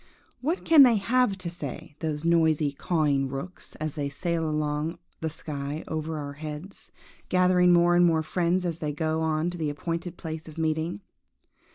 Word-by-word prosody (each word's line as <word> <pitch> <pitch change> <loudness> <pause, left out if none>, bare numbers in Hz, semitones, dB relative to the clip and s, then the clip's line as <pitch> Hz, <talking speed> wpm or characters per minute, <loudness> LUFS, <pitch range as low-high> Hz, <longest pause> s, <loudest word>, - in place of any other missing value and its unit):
– - - -38
What 320 +8 -1
can 320 -3 +8
they 245 -4 +8
have 230 0 +2
to 180 -3 -5
say, 145 -3 -7
those 155 -1 -3
noisy, 160 -3 +3
cawing 145 -3 +1
rooks, 140 +8 -7
as 155 -1 -4
they 145 -2 -2
sail 165 +2 -1
along 150 +2 -1 0.2
the 160 - -2
sky 150 -1 -5
over 160 0 -3
our 145 -1 -5
heads, 155 +5 -8 0.4
gathering 180 -1 +4
more 175 0 +5
and 175 - +5
more 165 -2 +3
friends 180 +2 0
as 170 -1 -2
they 150 -2 -2
go 160 +1 -1
on 160 +2 0
to 175 - -8
the 155 -2 0
appointed 165 +4 -4
place 160 -1 -6
of 155 - -11
meeting? 160 +3 -1
160 Hz, 180 wpm, -27 LUFS, 150-175 Hz, 0.4 s, can